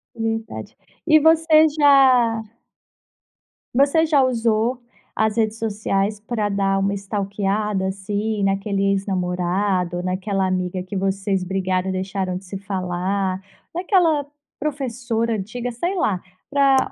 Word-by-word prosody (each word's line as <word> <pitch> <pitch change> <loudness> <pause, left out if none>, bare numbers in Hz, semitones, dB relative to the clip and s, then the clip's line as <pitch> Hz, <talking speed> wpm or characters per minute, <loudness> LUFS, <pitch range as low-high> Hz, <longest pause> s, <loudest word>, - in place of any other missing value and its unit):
Verdade, 225 0 -4 0.3
e 310 -1 +7
você 320 0 +5
já 255 -6 +5 1.3
você 285 +5 +4
já 290 -4 +4
usou 235 0 +1 0.3
as 220 0 +1
redes 220 0 0
sociais 205 -1 -1
pra 215 -1 -2
dar 195 -1 +1
uma 200 +1 0
stalkeada, 200 0 -2
assim, 205 +2 -2
naquele 195 0 0
ex-namorado, 180 -1 -1
naquela 190 +1 -1
amiga 185 0 -2
que 195 +2 -8
vocês 195 0 -1
brigaram 185 0 -1
e - - 0
deixaram 190 -1 -2
de 190 - -11
se 195 +1 -6
falar, 190 0 -2 0.3
naquela 345 -6 +2 0.3
professora 245 -5 -2
antiga, 235 +5 -4
sei 345 +12 -2
lá, 195 - 0 0.3
pra 275 -2 +3
205 Hz, 115 wpm, -21 LUFS, 190-245 Hz, 1.3 s, e